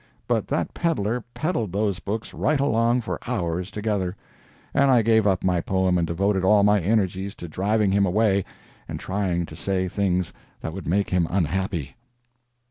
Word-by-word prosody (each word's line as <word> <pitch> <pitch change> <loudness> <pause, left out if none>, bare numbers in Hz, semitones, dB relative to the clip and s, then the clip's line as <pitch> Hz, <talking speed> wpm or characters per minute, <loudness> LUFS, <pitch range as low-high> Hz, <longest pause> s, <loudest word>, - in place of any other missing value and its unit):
But - - 0
that - - -1
peddler 125 - -1
peddled 140 - -1
those 100 -1 0
books 105 +6 -4
right 150 0 +1
along 120 -2 +2
for 115 - -4
hours 90 -6 -2
together, 100 -3 -2 0.6
and 140 0 +4
I 125 -3 +5
gave 110 -1 +4
up 95 -2 +1
my 90 -2 +2
poem 95 -1 +1
and 85 - 0
devoted 95 +3 0
all 100 +2 +5
my 105 -1 +4
energies 95 0 0
to 85 - -8
driving 100 +5 +1
him 100 0 +3
away 100 0 +2 0.4
and - - -5
trying 95 -3 -1
to - - -11
say 95 -1 -1
things 90 -2 0 0.3
that 80 - -4
would 95 -2 -7
make 100 +5 +1
him 90 -2 +2
unhappy. 90 - -1
100 Hz, 170 wpm, -24 LUFS, 90-110 Hz, 0.6 s, I